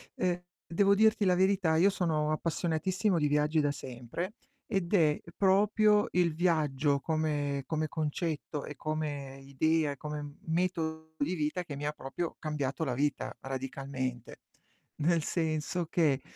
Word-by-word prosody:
ehm, 180 -1 0 0.3
devo 200 +4 +4
dirti 215 0 +4
la 180 -1 +4
verità, 185 -3 +3
io 185 +5 +6
sono 155 -5 0
appassionatissimo 175 +4 0
di 150 - +2
viaggi 150 +2 +2
da 145 - +1
sempre 130 - -5 0.3
ed 195 -4 -2
è 155 -6 +4 0.2
proprio 210 +2 +4
il 175 -2 +2
viaggio 150 -4 +2
come 145 -3 -1
come 155 -1 -1
concetto, 155 -1 -3
e 150 - -7
come 145 -3 -4
idea, 150 +3 +1
e 140 - -7
come 150 0 -6
metodo 160 -2 -1
di 160 +6 0
vita 155 +3 -1
che 150 -5 -7
mi 145 +1 -5
ha 150 - +1
proprio 150 +4 -5
cambiato 150 -1 -2
la 155 - -1
vita, 145 +2 -1
radicalmente. 130 -2 -4 0.6
Nel 165 +1 +3
senso 160 +1 -1
che, 155 -5 +2
155 Hz, 145 wpm, -31 LUFS, 145-175 Hz, 0.6 s, io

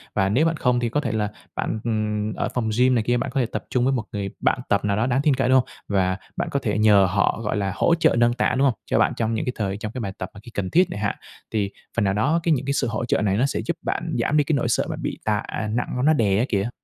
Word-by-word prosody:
Và 95 -2 +2
nếu 130 +10 +3
bạn 165 -1 +1
không 125 -3 +2
thì 120 -1 -1
có 145 - 0
thể 125 -7 -2
là 105 -2 -1 0.3
bạn, 110 - -2
ừm, 110 -1 -1
ở - - -2
phòng 115 -3 -1
gym 125 +1 +4
này 115 - +1
kia, 120 +2 +1
bạn - - -2
có 135 - +1
thể 125 - +2
tập 115 - -5
chung 125 -1 +1
với 135 - +2
một 125 -4 -1
người 100 -2 -3
bạn - - +1
tập - - +2
nào 100 0 +1
đó 110 - +1
đáng 130 +2 +1
tin 150 -3 +4
cậy, 130 -1 0
đúng 130 0 +6
không? - - -15 0.2
Và 95 -2 +1 0.2
bạn - - -1
có 140 - +1
thể 105 -5 -1
nhờ 105 -2 +5
họ 100 +2 +1
gọi 105 - -1
là 100 -2 -1
hỗ 170 - +3
trợ 165 - +3
nâng 120 0 +4
tạ, 125 0 +1
đúng 140 +1 +4
không? 120 -6 -1
Cho - - +1
bạn - - +3
trong 115 0 0
những 110 - -2
cái 125 - -2
thời 100 -2 -2
trong 110 0 -5
cái 125 - -5
bài 100 -3 -3
tập 95 - -5
khi 120 - -12
cần 100 -3 -3
thiết 180 - +4
chẳng 100 - -5
hạn, 100 - 0 0.4
thì 100 -2 -1 0.3
phần 115 - +3
nào 95 - +2
đó 145 +11 +2
cái 165 - +2
những 135 -2 -1
cái 140 - 0
sự - - 0
hỗ 115 +2 -2
trợ 120 - +1
này 100 -1 +1
nó 125 - +3
sẽ 140 - -1
giúp - - -2
bạn - - -3
giảm 150 - +1
đi 150 - +4
cái 155 - -1
nỗi 125 - 0
sợ 115 - +2 0.2
bị - - -4
tạ - - +1 0.3
nặng 120 +3 -1 0.2
nó 155 - +5
đè, 100 -8 +2
á, 120 - +2
kìa. 100 +1 0
115 Hz, 315 wpm, -23 LUFS, 105-130 Hz, 0.4 s, đúng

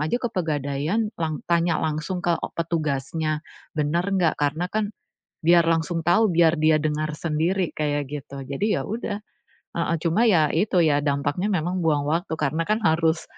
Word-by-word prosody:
saja 155 +9 0
ke 240 - 0
Pegadaian, 155 +4 -1
lang 155 -3 -2
tanya 170 0 +3
langsung 160 +4 -2
ke 170 -1 +2
e - - -3
petugasnya, 155 -2 -1 0.4
benar 155 +3 +1
enggak, 185 -5 +2
karena 155 +5 0
kan 215 -1 -1 0.5
biar 170 0 +6
langsung 165 0 0
tahu, 195 +6 +4
biar 165 0 +4
dia 155 0 +4
dengar 155 0 -1
sendiri, 170 +3 0
kayak 145 -1 0
gitu. 140 -1 -6
Jadi, 170 +11 0
iya - - -2
udah, 220 -1 -3 0.6
heeh, 170 0 0
cuma 175 +8 +3
iya 160 -7 +4
itu, 190 +4 +1
iya 150 -3 +3
dampaknya 145 +6 0
memang 180 -1 -1
buang 150 -3 +2
waktu. 165 +1 -1
Karena 155 +3 0
kan 215 +2 +2
harus 160 0 +2
160 Hz, 165 wpm, -24 LUFS, 150-180 Hz, 0.6 s, biar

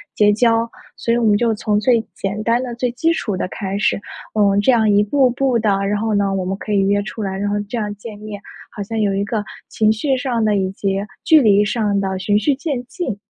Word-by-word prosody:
结 210 -1 +4
交。 230 +1 +2 0.3
所 230 - 0
以 - - +2
我 240 - 0
们 210 -1 +4
就 230 0 +1
从 210 -1 0
最 235 +1 +3
简 200 +2 -3
单 235 +2 +2
的 245 -2 -5
最 245 0 -1
基 325 +7 +1
础 210 -10 -2
的 - - -2
开 195 0 -4
始， 205 - +1 0.3
呃， 200 -2 +3
这 235 - +4
样 225 -3 +3
一 205 0 +4
步 260 +4 +3
步 250 -1 +1
的。 215 -1 +1 0.2
然 205 +1 0
后 220 0 0
呢， 200 -1 +1
我 190 -1 -1
们 190 +1 -3
可 215 - -6
以 205 - +3
约 205 0 +2
出 215 +2 -7
来， 190 -2 -3
然 205 +1 -2
后 205 - 0
这 240 - -3
样 210 -2 -2
见 210 +1 -9
面， 210 -1 -8 0.3
好 210 - -5
像 220 +3 -3
有 205 -2 +1
一 195 +1 0
个 215 0 -2 0.3
情 215 -1 +2
绪 265 +5 0
上 250 -3 -1
的 210 -1 +2
以 190 -1 0
及 195 0 -2 0.3
距 315 - +6
离 205 -5 +4
上 210 -2 0
的 190 -1 -2
循 205 +2 +1
序 285 +5 +1
渐 275 -3 -3
进。 265 - -4
215 Hz, 270 characters per minute, -19 LUFS, 205-235 Hz, 0.3 s, 距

